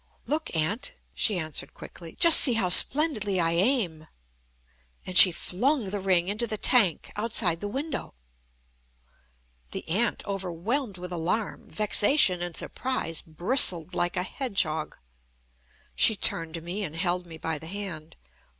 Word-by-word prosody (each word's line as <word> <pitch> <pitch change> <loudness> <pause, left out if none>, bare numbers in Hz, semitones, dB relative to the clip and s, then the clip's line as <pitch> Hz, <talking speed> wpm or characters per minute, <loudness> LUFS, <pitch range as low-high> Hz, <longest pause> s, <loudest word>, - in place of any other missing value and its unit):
"Look, 310 - -3
Aunt," 205 - -2 0.2
she 210 -4 0
answered 155 -4 -5
quickly, 170 -2 -12
"just 335 -2 +9
see 255 - +7
how 210 -5 -1
splendidly 210 - +4
I 165 -1 0
aim." 175 - -2 1.0
And 185 - -8
she 180 - +8
flung 220 - -2
the 205 - -4
ring 185 -2 0
into 210 +4 -3
the 215 - -5
tank 205 - +1
outside 210 -6 +1
the 205 - -5
window. 270 - -6 1.5
The - - -8
aunt, 210 +8 -2
overwhelmed 195 - -5
with 180 0 -10
alarm, 180 +6 -4
vexation, 210 - +2
and 175 -1 -6
surprise, 250 -11 -3
bristled 175 - +3
like 175 +2 -3
a 180 - -1
hedgehog. 185 - -3 1.0
She 220 - +1
turned 165 -4 +1
to 165 - -7
me, 180 +5 -6
and 160 -4 -7
held 180 +1 -3
me 165 -1 -11
by 160 -1 -5
the 160 - -11
hand. 175 -5 -8
185 Hz, 140 wpm, -25 LUFS, 170-225 Hz, 1.5 s, just